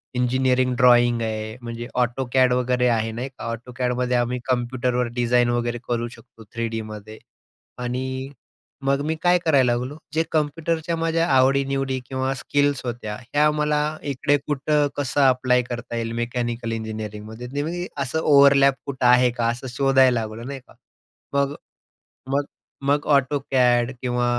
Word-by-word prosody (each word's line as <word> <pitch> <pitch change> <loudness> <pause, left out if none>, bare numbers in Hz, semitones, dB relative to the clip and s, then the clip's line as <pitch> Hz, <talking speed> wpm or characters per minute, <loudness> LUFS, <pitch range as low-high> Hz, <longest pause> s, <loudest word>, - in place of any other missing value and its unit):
Engineering 125 0 +1
drawing 120 -1 +5
आहे, 110 +1 -4
म्हणजे 120 0 -6
AutoCAD 125 +1 +2
वगैरे 125 0 +1
आहे, 115 -1 0
नाही 125 +4 -5
का? 120 -3 -6
AutoCADमध्ये 125 +1 -2
आम्ही 120 +1 -1
कम्प्युटरवर 125 0 0
डिझाईन 120 0 +2
वगैरे 120 0 -1
करू 120 0 -1
शकतो 115 -3 -17
3Dमध्ये 110 -2 -5 0.7
आणि 130 +2 -3 0.6
मग 140 0 +2
मी 160 +1 -1
काय 180 0 +4
करायला 135 -6 +4
लागलो, 125 +5 -3 0.2
जे 160 +1 +2
कम्प्युटरच्या 160 +2 -1
माझ्या 165 +1 +1
आवडीनिवडी 135 0 +2
किंवा 130 0 -1
स्किल्स 145 +1 0
होत्या, 120 -3 -4 0.2
ह्या 150 +1 +4
मला 150 0 0 0.3
इकडे 145 +2 +1
कुठं 150 0 +1
कसं 145 0 0
अप्लाय 125 -1 +3
करता 120 -1 -6
येईल 115 -1 -2
मेकॅनिकल 120 -1 -3
इंजिनिअरिंगमध्ये, 110 +1 -6
नाही 145 +1 -2
म्हणजे 175 +3 -3
ते - - -7
असं 140 +4 -1
ओव्हरलॅप 140 -2 +5
कुठं 130 -2 -3
आहे 125 0 +6
का, 120 -1 -1
असं 125 +3 -4
शोधायला 130 -1 +3
लागलो, 110 +1 -6
नाही 135 +1 -6
का? - - -18 0.6
मग 140 +1 +1 0.8
मग 140 +1 +1 0.4
मग 145 +1 +1
AutoCAD 130 -3 +2
किंवा 125 -1 0
125 Hz, 145 wpm, -23 LUFS, 120-140 Hz, 0.8 s, आहे